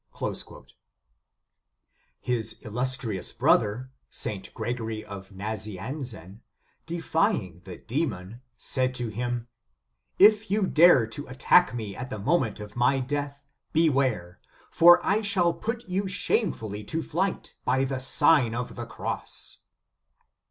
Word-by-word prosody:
"* - - -7 1.5
His 115 -3 0
illustrious 120 -3 -1
brother, 120 +5 +1 0.2
St. 105 -5 -1
Gregory 115 -3 -4
Nazi 100 +1 -6
anzen, 110 - -7 0.5
defying 165 - -1
the 95 -2 -8
demon, 115 - -4 0.2
said 130 -1 +1
to 120 -2 -2
him: 120 +2 -3 0.7
"If 210 +2 +5
you 205 0 +2
dare 165 -8 +6
to 145 +7 -7
attack 130 +4 +3
me 105 -4 -5
at 130 0 -6
the 110 - -5
moment 120 -1 0
of 105 0 -9
my 125 +3 +2
death, 140 +2 -4 0.3
beware: 130 - +1 0.3
for 175 +1 +7
I 205 +3 +2
shall 190 -5 +2
put 230 +3 -5
you 190 +2 -1
shamefully 115 - -1
to 160 +8 -3
flight 190 +7 -2
by 130 +1 +1
the 135 -1 -2
Sign 130 -3 +4
of 125 +1 -4
the 120 -1 -6
Cross." - - -5
125 Hz, 120 wpm, -26 LUFS, 110-165 Hz, 1.5 s, for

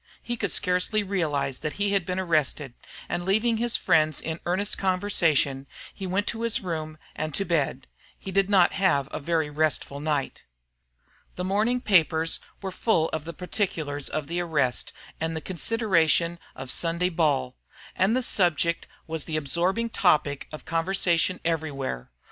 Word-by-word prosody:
He 240 - -3
could 200 -6 -2
scarcely 180 +6 +1
realize 155 -9 -1
that 150 -1 -3
he 205 0 0
had 195 -3 +1
been 180 0 -1
arrested; 155 -6 0 0.3
and 175 - -2
leaving 220 +5 +2
his 235 +1 +1
friends 155 -2 +3
in 160 +1 -4
earnest 190 +4 0
conversation, 170 -8 +1 0.3
he 195 - -6
went 195 +3 0
to 225 - -3
his 230 -1 0
room 155 -4 -4 0.2
and 155 -1 -3
to 195 - +1
bed. 145 -6 0 0.3
He 195 - -7
did 195 +1 +2
not 190 -4 +5
have 165 -9 +2
a - - -4
very 160 0 0
restful 150 -2 0
night. 145 -2 -2 0.9
The 180 - -3
morning 215 +6 +1
papers 165 -6 +3 0.2
were 190 - -3
full 175 -5 +1
of 160 -1 -4
the 170 - -6
particulars 160 -6 -2
of 155 -1 -2
the 170 +4 -2
arrest 150 -7 0 0.3
and 160 0 -2
the - - -1
consideration 175 - +1 0.2
of 130 -1 -1
Sunday 170 +2 +1
ball; 140 -7 +1 0.4
and 200 +6 +3
the 255 - 0
subject 170 -5 +1 0.2
was 160 -2 -3
the 155 - -2
absorbing 180 +10 0
topic 150 -8 +2
of 155 - -9
conversation 175 +1 +1
everywhere. 145 - -2
170 Hz, 160 wpm, -26 LUFS, 155-195 Hz, 0.9 s, not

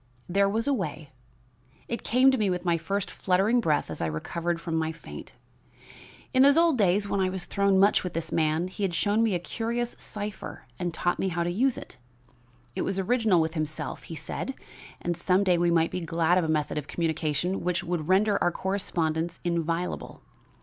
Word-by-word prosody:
There 195 +2 +3
was 225 +3 0
a 285 - +3
way 155 - -4 0.8
it 235 - -3
came 255 +3 +5
to 265 - +1
me 205 -2 +2
with 180 0 -2
my 170 -1 +3
first 190 +4 -2
fluttering 195 +6 +2
breath 150 - +1
as 80 - -5
I 80 - +1
recovered 170 - -2
from 165 0 -5
my 160 0 0
faint. 165 - -10 1.0
In 260 - +5
those 280 +2 +6
old 335 -2 +5
days 200 -2 +2
when 200 - -1
I 190 -1 +2
was 185 -2 -4
thrown 200 -1 +2
much 200 +2 +4
with 180 - -4
this 165 - -3
man, 160 +2 +1
he 185 - -9
had 190 -4 0
shown 205 +5 +2
me 220 -4 +2
a - - 0
curious 235 +6 -3
cipher 205 -8 -6
and 175 -1 -1
taught 175 +2 -1
me 190 - +1
how 170 -2 -1
to 175 - -1
use 250 +7 +1
it. - - -10 0.8
It 185 - -1
was 195 - -1
original 215 -1 +3
with 160 0 0
himself, 155 -2 -3
he 165 - -7
said, 160 - -5 0.4
and 175 0 -2
some 185 +3 +2
day 180 -3 +3
we 175 0 +3
might 165 -1 +2
be 180 - -3
glad 165 +2 +2
of - - 0
a - - -1
method 150 -1 0
of 150 - -9
communication 160 +2 -1
which 180 0 0
would 170 -2 -3
render 200 +2 +3
our 175 - +3
correspondence 170 -4 -1
inviolable. 170 0 -2
180 Hz, 205 wpm, -27 LUFS, 165-200 Hz, 1.0 s, those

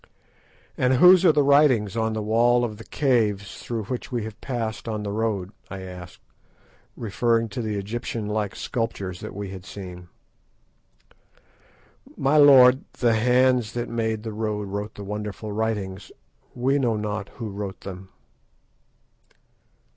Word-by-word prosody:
"And 130 0 +3
whose 180 +6 +7
are 170 - +8
the 150 -1 +3
writings 135 -8 +4
on 110 -1 0
the 110 -1 -3
wall 120 +3 +3
of 110 -3 -6
the 115 - -10
caves 110 -9 0
through 115 -2 -4
which 125 +6 -5
we 120 -3 -2
have 110 0 -8
passed 115 -4 -4
on 105 -2 -3
the 100 - -3
road?" 105 -3 -2 0.2
I 95 -1 -7
asked, 90 -1 -10 0.7
referring 115 +1 0
to 110 +4 -4
the 110 -2 -3
Egyptian 110 +2 -4
like 105 -1 -2
sculptures 100 -6 -3
that - - -8
we 100 -1 -5
had 95 -2 -8
seen. 90 -3 -9 2.1
"My 140 +3 +2
lord, 130 -3 +7
the 120 -2 +2
hands 125 0 +3
that 120 0 -3
made 110 -2 -2
the 110 -2 -5
road 105 -2 -3
wrote 105 +2 -5
the 100 - -8
wonderful 105 +1 -5
writings. 100 -3 -3 0.4
We 135 +3 +1
know 120 -4 +1
not 105 -1 -3
who 115 -4 -5
wrote 100 -1 -6
them." 95 0 -9
110 Hz, 145 wpm, -24 LUFS, 100-120 Hz, 2.1 s, are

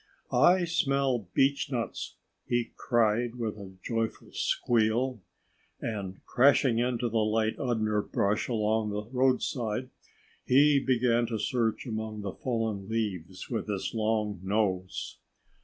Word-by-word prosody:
"I 175 +8 +5
smell 135 - +1
beechnuts!" 135 -3 0 0.3
he 120 -1 0
cried 120 0 +1
with 115 -3 -3
a 95 -1 -10
joyful 115 -1 -3
squeal. 120 +1 +1 0.6
And 100 -4 -5
crashing 130 -2 +4
into 120 0 0
the 115 0 0
light 110 +1 +1
underbrush 110 -4 0
along 110 -2 +1
the 105 0 -3
roadside, 130 -2 0 0.5
he 140 +2 +5
began 120 -2 +2
to 115 -1 -2
search 115 +2 0
among 110 -2 -4
the 100 -2 -4
fallen 110 -5 -2
leaves 95 -5 -3
with 115 - -2
his 100 -3 -2
long 110 -3 0
nose. 95 -2 -1
115 Hz, 115 wpm, -29 LUFS, 105-125 Hz, 0.6 s, I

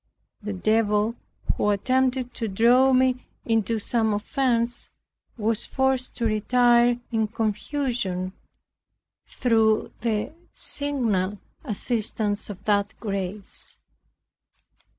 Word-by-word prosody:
The 210 0 -4
devil, 210 +2 +2 0.4
who 210 - +1
attempted 255 +4 +1
to 225 - -3
draw 240 +6 +4
me 255 0 +3 0.2
into 225 -1 +1
some 220 0 +1
offence, 235 +2 0 0.5
was 225 0 -1
forced 265 -1 0
to 235 - -1
retire 240 +2 +4
in 220 -2 +1
confusion, 215 -3 -2 0.9
through 220 -3 +2
the 225 +4 -1 0.2
signal 225 -9 -1 0.3
assistance 215 -4 0
of 200 -1 -8
that 205 -1 +1
grace. 200 -1 -5
225 Hz, 90 wpm, -25 LUFS, 210-245 Hz, 0.9 s, draw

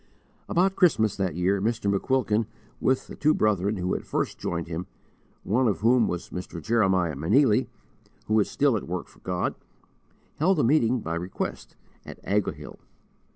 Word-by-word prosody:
About 190 +3 +2
Christmas, 110 - +3
that 95 -5 -1
year, 95 +3 +1
Mr. 110 0 -1
McQuilkin, 110 -1 +1 0.3
with 130 0 +1
the - - -10
two 155 +1 +2
brethren 105 -1 +1
who 90 0 -1
had - - -3
first - - -2
joined 85 -1 -3
him 85 +2 -5 0.6
one 125 +5 +2
of 100 - -1
whom 120 +1 +4
was 90 0 -4
Mr. 90 -1 -6
Jeremiah 95 -5 +1
Meneely, 105 - +3 0.6
who 110 0 +2
is 105 - +1
still 140 -4 +2
at 105 - -4
work 90 0 -4
for - - -21
God 90 -1 -2 0.8
held 180 +4 +2
a - - +3
meeting 120 -2 +3
by 85 - -4
request 90 +2 -5 0.3
at - - -10
Ahoghill. 105 0 -2
105 Hz, 160 wpm, -26 LUFS, 90-125 Hz, 0.8 s, whom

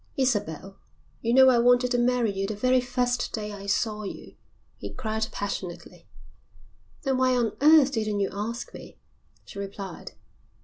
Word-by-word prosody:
"Isabel, 195 - -1 0.4
you 230 - 0
know 260 +1 +7
I 245 -2 +4
wanted 245 +1 +4
to 245 - +2
marry 240 -2 +2
you 195 0 -2
the 215 - -4
very 255 +4 +2
first 245 0 -1
day 210 -1 -4
I 200 -1 -8
saw 210 +1 0
you," 200 - -8 0.4
he - - -6
cried 220 -3 -2
passionately. 190 -3 -6 1.0
"Then 270 -2 0
why 255 0 +3
on 230 -3 +1
earth 300 -2 +6
didn't 215 -4 -1
you 195 - 0
ask 225 +4 -5
me?" - - -11 0.5
she 200 - -9
replied. 195 -2 -7
230 Hz, 160 wpm, -26 LUFS, 200-250 Hz, 1.0 s, know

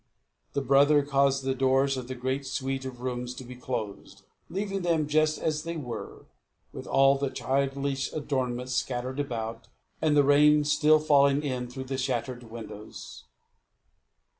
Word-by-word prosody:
The 140 - -1
brother 145 +2 +5
caused 140 -1 +2
the 135 0 0
doors 135 +1 +2
of 130 -2 -5
the 130 - -5
great 130 +2 -2
suite 135 0 -3
of 125 -2 -7
rooms 125 -1 -4
to 130 - -8
be 125 0 -10
closed, 115 -5 -6 0.3
leaving 195 +1 -3
them 165 -4 +1
just 155 +1 +2
as 155 -1 -1
they 165 +1 -5
were, 125 -6 -7 0.5
with - - -8
all 135 0 +4
the 140 -1 0
childish 135 +1 -1
adornment 130 -4 -2
scattered 130 +1 -2
about, 115 -5 -4 0.3
and 150 -2 +3
the 145 - +6
rain 150 +1 +5
still 150 +1 +4
falling 145 -1 +3
in 125 -3 -3
through 130 +2 -6
the 130 0 -4
shattered 125 -1 -2
windows. 110 -2 -10
135 Hz, 155 wpm, -28 LUFS, 125-145 Hz, 0.5 s, the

